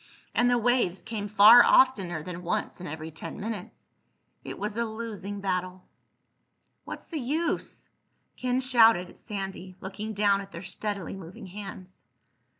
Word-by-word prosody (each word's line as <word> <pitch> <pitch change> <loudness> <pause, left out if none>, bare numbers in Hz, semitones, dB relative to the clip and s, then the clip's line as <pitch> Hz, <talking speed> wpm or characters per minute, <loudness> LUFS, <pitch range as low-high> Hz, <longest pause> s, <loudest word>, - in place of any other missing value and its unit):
And 245 0 +3
the 245 - +3
waves 235 -6 +1
came 220 -2 -4
far 215 +3 +9
oftener 190 -11 +3
than 180 +1 -7
once 175 +1 -3
in 180 - -6
every 160 +1 -6
ten 160 - -8
minutes. 210 -3 -7 0.5
It - - -7
was 210 +1 -4
a 235 - 0
losing 215 -3 -6
battle. 185 -1 -2 1.0
"What's - - -7
the 320 - -5
use?" 300 +7 -2 0.5
Ken 250 0 0
shouted 225 -8 +5
at - - -19
Sandy, 195 -2 -6
looking 205 +3 -6
down 200 -1 +3
at 195 0 -11
their 170 - -8
steadily 195 0 -4
moving 185 -1 -10
hands. 190 -1 -9
200 Hz, 150 wpm, -27 LUFS, 185-230 Hz, 1.0 s, far